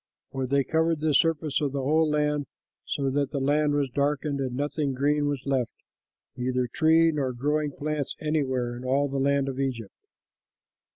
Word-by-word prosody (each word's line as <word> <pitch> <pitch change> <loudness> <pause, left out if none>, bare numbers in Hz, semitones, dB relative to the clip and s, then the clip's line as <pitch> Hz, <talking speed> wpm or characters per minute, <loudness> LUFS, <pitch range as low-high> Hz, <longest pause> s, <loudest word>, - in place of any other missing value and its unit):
For 130 -1 -2
they 140 +1 +2
covered 160 +2 +1
the 155 0 +1
surface 155 0 +2
of 140 -2 -1
the 140 -1 -2
whole 155 +3 +3
land, 150 -1 0 0.4
so 135 -2 -1
that 140 0 0
the 140 - -3
land 145 +2 +2
was 140 -3 0
darkened 145 +1 0
and 130 -2 -2
nothing 145 0 -1
green 145 +2 +1
was 140 -2 -3
left, 135 -4 0 0.6
neither 125 0 0
tree 160 +5 +4
nor 135 -4 -1
growing 150 +4 0
plants, 150 0 -3
anywhere 130 -6 -1
in 120 - -8
all 135 +3 +1
the 135 0 -2
land 140 0 +2
of 135 -1 -4
Egypt. 125 -6 -3
140 Hz, 175 wpm, -26 LUFS, 135-150 Hz, 0.6 s, tree